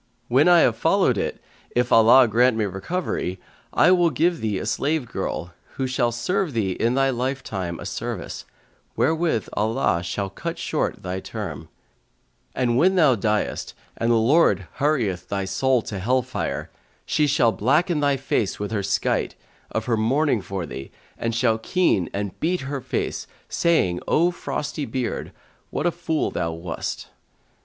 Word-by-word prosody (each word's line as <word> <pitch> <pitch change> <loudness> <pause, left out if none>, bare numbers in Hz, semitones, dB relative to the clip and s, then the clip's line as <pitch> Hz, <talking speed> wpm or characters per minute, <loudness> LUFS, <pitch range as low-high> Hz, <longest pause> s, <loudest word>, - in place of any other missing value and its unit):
When 135 +7 +4
I 175 -1 +7
have 115 - +3
followed 165 - +3
it, - - -2 0.4
if 120 0 +1
Allah 120 +3 +7
grant 120 +2 +3
me 110 - +1
recovery, 95 - -3 0.3
I 175 - +5
will 175 -2 +4
give 165 +4 +1
thee 105 -3 -1
a - - -4
slave 150 -1 0
girl, 90 -5 -4 0.2
who 135 - -1
shall 125 -2 +1
serve 170 - -1
thee 105 -5 0
in 115 +6 0
they 135 0 +3
lifetime 120 -9 -3
a - - -7
service, - - -5 0.5
wherewith 160 - +1
Allah 105 -5 +1
shall 95 +3 -3
cut - - -5
short - - -2
thy 90 +1 -3
term; - - -6 0.9
and 120 -1 +1
when 185 +5 +4
thou 155 -7 +5
diest 105 -1 -1 0.2
and 115 - -1
the - - +5
Lord 115 - +3
hurrieth 115 -12 0
thy 100 -1 -1
soul 120 +6 +1
to 100 - -5
hell 125 +6 +1
fire, 130 +1 -4 0.3
she 150 - +2
shall 130 -5 +3
blacken 150 - +2
thy 140 -1 +2
face 120 -6 -1
with 105 +1 -3
her 105 -3 0
skite, 100 0 0 0.3
of 110 - -3
her 115 -2 +1
mourning 125 +2 +2
for 95 -2 -4
thee, 70 -3 -8 0.3
and 115 -1 -2
shall 115 -2 +2
keen 110 - +1
and 100 -1 -4
beat 175 +3 0
her 135 0 -4
face, 130 - -3 0.2
saying 125 - +2
O 170 +3 +3
frosty 150 -4 -4
beard, 130 -3 -3 0.4
what 150 - -3
a 175 - +3
fool 160 -1 -1
thou 85 0 -2
wast?'" 80 +1 -5
120 Hz, 165 wpm, -23 LUFS, 100-150 Hz, 0.9 s, I